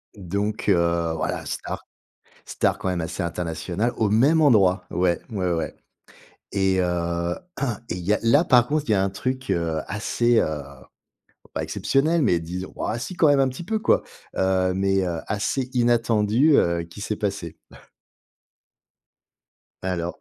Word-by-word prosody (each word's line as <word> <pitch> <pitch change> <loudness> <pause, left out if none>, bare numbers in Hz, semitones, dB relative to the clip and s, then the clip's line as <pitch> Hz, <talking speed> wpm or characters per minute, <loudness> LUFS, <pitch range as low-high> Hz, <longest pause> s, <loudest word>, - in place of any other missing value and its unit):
Donc, 100 +3 -2
heu, 85 -2 +2
voilà, 80 - -3
star, - - -5 0.6
star - - 0
quand - - -4
même 90 -2 -1
assez 80 +3 -4
internationale. 85 +6 -2
Au 110 -2 +2
même 135 +10 +4
endroit. 100 - +4
Ouais, 90 -1 +1
ouais, 95 -6 -1
ouais. 80 - -3 0.8
Et, 95 -1 +1
heu, 85 0 -1 0.5
et - - -2
il - - -5
y 105 - +3
a, - - +1
là, 140 +8 +5
par 120 -5 +4
contre 150 +1 0
il - - +1
y - - +5
a 95 - +2
un 100 - +1
truc, 130 +6 -4
heu, 85 -2 0
assez, 115 +4 +1
heu 75 -2 -1 0.9
pas - - -2
exceptionnel, 155 +5 +1
mais 90 - +3
disons 90 +3 -6
ouais 115 - -2
si 180 +9 -6
quand 160 - +5
même 145 -1 +4
un 135 - +3
petit 130 +7 -7
peu 220 +5 -1
quoi, 215 - +2 0.3
heu, 95 -1 +2
mais, 95 0 +1
heu, 85 -2 -2
assez 110 +5 -1
inattendu, 120 +3 +3
heu, 85 0 +2
qui 85 +4 -12
s'est 105 +1 -2
passé. 100 -6 -3 2.3
Alors, 90 -2 -3
100 Hz, 160 wpm, -24 LUFS, 85-120 Hz, 2.3 s, là